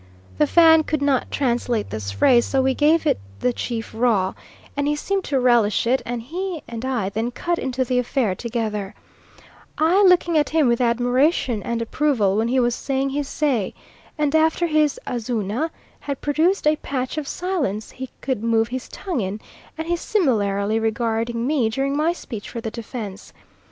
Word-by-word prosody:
The 150 Hz, -, +4 dB
Fan 320 Hz, -1 st, +6 dB
could 305 Hz, -1 st, -2 dB
not 275 Hz, -3 st, +1 dB
translate 240 Hz, -4 st, -1 dB
this 110 Hz, -2 st, -4 dB
phrase, 235 Hz, -, +4 dB
so 270 Hz, -, 0 dB
we 265 Hz, 0 st, +2 dB
gave 310 Hz, +4 st, +3 dB
it -, -, +2 dB, 0.2 s
the 250 Hz, -, +1 dB
chief 230 Hz, -2 st, -4 dB
raw; 220 Hz, -5 st, +1 dB, 0.4 s
and 285 Hz, 0 st, 0 dB
he 295 Hz, -, +1 dB
seemed 390 Hz, +5 st, -1 dB
to 275 Hz, -2 st, 0 dB
relish 240 Hz, -5 st, +3 dB
it, 255 Hz, +3 st, +2 dB
and 240 Hz, -1 st, -3 dB
he 350 Hz, +4 st, -4 dB
and 235 Hz, 0 st, -6 dB
I 245 Hz, -7 st, -1 dB
then 220 Hz, +4 st, -2 dB
cut 340 Hz, +8 st, -2 dB
into 260 Hz, 0 st, -1 dB
the 250 Hz, 0 st, +1 dB
affair 245 Hz, -4 st, 0 dB
together, 215 Hz, -3 st, -3 dB, 0.8 s
I 335 Hz, +6 st, +4 dB
looking 350 Hz, -4 st, +5 dB
at 295 Hz, -, 0 dB
him 310 Hz, -3 st, +3 dB
with 235 Hz, +1 st, +2 dB
admiration 245 Hz, -, +2 dB
and 230 Hz, +1 st, -2 dB
approval 230 Hz, -7 st, +1 dB
when 220 Hz, +2 st, +1 dB
he 255 Hz, +2 st, +2 dB
was 240 Hz, -1 st, +2 dB
saying 270 Hz, +2 st, -1 dB
his 285 Hz, 0 st, -2 dB
say, 265 Hz, -12 st, -1 dB, 0.4 s
and 300 Hz, -1 st, 0 dB
after 320 Hz, +2 st, +3 dB
his 305 Hz, -3 st, +2 dB
"Azuna" 235 Hz, +4 st, -2 dB, 0.3 s
had 280 Hz, -2 st, -5 dB
produced 320 Hz, +7 st, +1 dB
a 305 Hz, 0 st, +4 dB
patch 260 Hz, +2 st, -3 dB
of 290 Hz, -, -6 dB
silence 315 Hz, -, -2 dB
he 260 Hz, 0 st, -7 dB
could 260 Hz, -6 st, -2 dB
move 225 Hz, 0 st, +2 dB
his 255 Hz, +1 st, -5 dB
tongue 355 Hz, -, -3 dB
in, 195 Hz, +2 st, -3 dB, 0.4 s
and 320 Hz, +1 st, -4 dB
he 345 Hz, -, +1 dB
similarly 220 Hz, -, +1 dB
regarding 230 Hz, +1 st, -1 dB
me 265 Hz, -5 st, +1 dB
during 270 Hz, +4 st, -1 dB
my 310 Hz, +3 st, +2 dB
speech 225 Hz, -11 st, -7 dB
for 235 Hz, -, -5 dB
the 225 Hz, -1 st, -5 dB
defence. 220 Hz, -4 st, -7 dB
250 Hz, 180 wpm, -22 LUFS, 225-300 Hz, 0.8 s, Fan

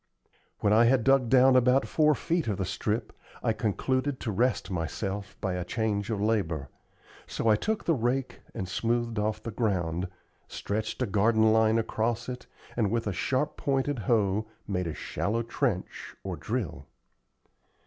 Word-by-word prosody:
When 105 Hz, -, +3 dB
I 115 Hz, +2 st, +6 dB
had 125 Hz, -1 st, +4 dB
dug 135 Hz, -1 st, +4 dB
down 130 Hz, +1 st, +6 dB
about 130 Hz, +2 st, +4 dB
four 150 Hz, -1 st, +3 dB
feet 170 Hz, -1 st, -1 dB
of 105 Hz, -3 st, -1 dB
the 95 Hz, -, -1 dB
strip, 105 Hz, +4 st, -2 dB, 0.3 s
I 115 Hz, -, +2 dB
concluded 130 Hz, +6 st, -1 dB
to 115 Hz, -, -2 dB
rest 115 Hz, 0 st, 0 dB
myself 95 Hz, +4 st, -3 dB
by 95 Hz, -3 st, -1 dB
a 90 Hz, 0 st, -2 dB
change 105 Hz, +1 st, -1 dB
of 110 Hz, -3 st, -1 dB
labor; 95 Hz, -10 st, 0 dB, 0.6 s
so -, -, -2 dB
I 110 Hz, -, +6 dB
took 215 Hz, -, -2 dB
the 165 Hz, -, +3 dB
rake 130 Hz, 0 st, -1 dB, 0.2 s
and 95 Hz, -, -3 dB
smoothed 115 Hz, +3 st, -1 dB
off 105 Hz, 0 st, -1 dB
the 115 Hz, -, -4 dB
ground, 90 Hz, -6 st, -1 dB, 0.4 s
stretched 110 Hz, +4 st, -3 dB
a -, -, +2 dB
garden 110 Hz, +1 st, +3 dB
line 110 Hz, 0 st, +4 dB
across 115 Hz, 0 st, -1 dB
it, 125 Hz, 0 st, -7 dB, 0.3 s
and, 110 Hz, -4 st, +1 dB
with 115 Hz, +2 st, -1 dB
a 100 Hz, -, -1 dB
sharp 130 Hz, +10 st, -1 dB
pointed 135 Hz, -1 st, 0 dB
hoe, 105 Hz, -1 st, +1 dB, 0.2 s
made 90 Hz, -3 st, -1 dB
a 80 Hz, -, -3 dB
shallow 115 Hz, +3 st, -2 dB
trench, 115 Hz, -5 st, -3 dB
or -, -, -3 dB
drill. 65 Hz, +1 st, -4 dB
110 Hz, 165 wpm, -28 LUFS, 100-125 Hz, 0.6 s, I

